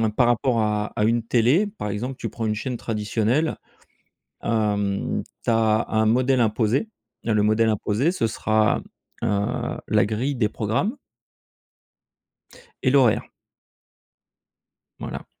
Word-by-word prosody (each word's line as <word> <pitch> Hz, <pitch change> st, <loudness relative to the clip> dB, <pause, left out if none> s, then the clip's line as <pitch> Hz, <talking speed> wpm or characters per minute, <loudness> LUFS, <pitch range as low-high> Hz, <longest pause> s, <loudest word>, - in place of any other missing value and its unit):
par 125 Hz, 0 st, +4 dB
rapport 120 Hz, 0 st, +2 dB
à 105 Hz, -1 st, 0 dB
à 105 Hz, -, +1 dB
une 115 Hz, 0 st, +2 dB
télé, 125 Hz, -, +3 dB
par 200 Hz, -, -6 dB
exemple, 120 Hz, +6 st, -3 dB
tu -, -, -5 dB
prends 115 Hz, -, -4 dB
une 110 Hz, -, +1 dB
chaîne 125 Hz, +3 st, -4 dB
traditionnelle, 110 Hz, +7 st, 0 dB, 0.9 s
heu, 105 Hz, -3 st, 0 dB, 0.2 s
tu -, -, +1 dB
as 110 Hz, 0 st, +3 dB
un 110 Hz, 0 st, +2 dB
modèle 130 Hz, +3 st, +3 dB
imposé. 115 Hz, -, +1 dB, 0.3 s
Le 110 Hz, -2 st, +1 dB
modèle 110 Hz, +2 st, +3 dB
imposé, 110 Hz, +7 st, +1 dB
ce 180 Hz, -11 st, 0 dB
sera, 110 Hz, 0 st, +1 dB, 0.4 s
heu, 100 Hz, 0 st, -1 dB
la -, -, +3 dB
grille 120 Hz, +7 st, -1 dB
des 115 Hz, -5 st, +1 dB
programmes 110 Hz, -, -1 dB, 1.9 s
et 130 Hz, -, +4 dB
l'horaire. 130 Hz, -5 st, +4 dB, 1.8 s
Voilà. -, -, -6 dB
110 Hz, 125 wpm, -23 LUFS, 105-125 Hz, 1.9 s, par